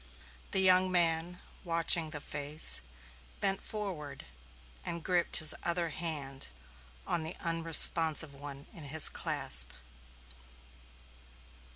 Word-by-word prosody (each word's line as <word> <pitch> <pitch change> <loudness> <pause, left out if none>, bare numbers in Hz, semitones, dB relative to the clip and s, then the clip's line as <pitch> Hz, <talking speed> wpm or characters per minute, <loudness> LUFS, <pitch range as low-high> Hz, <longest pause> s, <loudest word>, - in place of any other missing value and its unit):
The 190 - +1
young 185 0 +3
man, 170 0 0 0.2
watching 165 -1 +3
the 150 -1 -6
face, 150 +1 -3 0.6
bent 195 0 -2
forward 185 -9 -8 0.6
and 170 -1 -5
gripped 180 -2 0
his 155 -3 +1
other 170 -1 -2
hand 150 -5 -5 0.6
on 170 - -2
the 160 +2 -7
unresponsive 165 -3 +5
one 140 0 -11
in 160 - -12
his 155 +2 +5
clasp. 65 -1 0
165 Hz, 100 wpm, -30 LUFS, 150-175 Hz, 0.6 s, unresponsive